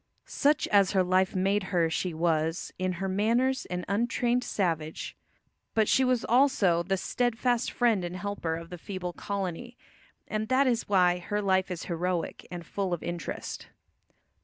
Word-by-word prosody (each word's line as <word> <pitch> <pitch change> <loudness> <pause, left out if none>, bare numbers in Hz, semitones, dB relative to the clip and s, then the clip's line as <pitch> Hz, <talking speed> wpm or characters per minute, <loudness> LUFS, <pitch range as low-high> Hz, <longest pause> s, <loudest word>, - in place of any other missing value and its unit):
Such 295 +1 +1
as 200 -2 +4
her 190 -2 +4
life 185 +1 +2
made 195 +2 +1
her 175 -4 +1
she 175 +3 -2
was 160 0 -1
in 185 0 0
her 190 +2 -3
manners 235 +7 +1
an 180 0 -4
untrained 240 +4 +1
savage. 160 -8 -2 0.6
But 220 -2 +3
she 265 - +4
was 255 -2 +1
also 235 -9 +3
the 190 +3 -1
steadfast 245 +3 0
friend 230 -6 +2
and 175 +1 -4
helper 185 -4 -3
of 165 +1 -8
the 180 - -7
feeble 180 -1 -5
colony, 200 +6 -4 0.5
and 215 0 -2
that 260 +4 +3
is 240 -5 0
why 180 -3 +4
her 205 +4 -2
life 190 -2 +1
is 180 -3 -4
heroic 175 0 -3
and 175 -1 -7
full 195 -1 -2
of 170 - -12
interest. 170 -3 -5
190 Hz, 160 wpm, -28 LUFS, 175-225 Hz, 0.6 s, as